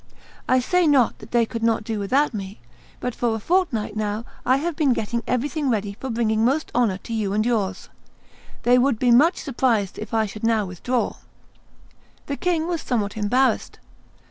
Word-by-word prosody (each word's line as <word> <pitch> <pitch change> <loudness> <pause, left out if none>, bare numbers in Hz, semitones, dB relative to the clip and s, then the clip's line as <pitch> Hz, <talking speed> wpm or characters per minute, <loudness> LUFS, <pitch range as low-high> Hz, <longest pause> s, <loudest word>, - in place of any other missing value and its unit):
I 255 - +5
say 355 +7 +2
not 275 -5 +3
that 215 - -12
they 235 -1 +3
could 230 +1 -6
not 230 -1 +1
do 220 -1 -3
without 265 +8 +1
me; 195 -1 -6 0.4
but 250 - -3
for 235 -2 0
a - - -3
fortnight 295 - 0
now 215 +1 -2 0.2
I 260 - +5
have 330 +3 -2
been 290 -5 +3
getting 235 +1 -2
everything 280 +3 -1
ready 205 -3 -1
for 265 - -5
bringing 225 -2 +1
most 275 +6 +1
honor 230 -6 +2
to 230 - -8
you 210 -3 -1
and 215 +1 +1
yours. 205 -6 -1 0.8
They 245 +1 +5
would 255 -2 +2
be 245 +1 +2
much 310 +9 +5
surprised 235 - 0
if 215 - -7
I 220 -1 +2
should 210 +1 -9
now 225 -2 +2
withdraw." 230 +7 -2 1.1
The 280 - -3
king 335 0 0
was 345 -2 -2
somewhat 210 -5 -1
embarrassed. 245 +5 +1
235 Hz, 185 wpm, -23 LUFS, 215-265 Hz, 1.1 s, I